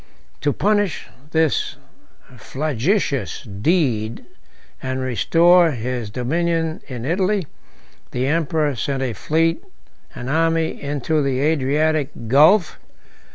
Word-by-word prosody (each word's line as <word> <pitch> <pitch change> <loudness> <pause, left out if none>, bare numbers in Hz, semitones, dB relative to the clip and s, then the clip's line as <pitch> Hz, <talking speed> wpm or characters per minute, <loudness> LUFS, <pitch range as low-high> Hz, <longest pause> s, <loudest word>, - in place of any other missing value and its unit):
To 145 - +1
punish 205 0 0 0.2
this 160 -2 +1 0.6
flagitious 140 - -1
deed, 115 - -1 0.6
and 130 0 -3
restore 165 - +4
his 120 -2 -4
dominion 160 +7 -1
in 125 -3 -6
Italy, 185 +4 0 0.6
the 125 +1 -2
emperor 150 0 +1
sent 135 +4 -2
a 125 -3 -2
fleet 165 +6 0 0.5
and 125 - -6
army 165 +2 0
into 145 +2 -1
the 135 -2 0
Adriatic 150 0 +1 0.2
Gulf. 155 - +4
150 Hz, 100 wpm, -21 LUFS, 130-165 Hz, 0.6 s, restore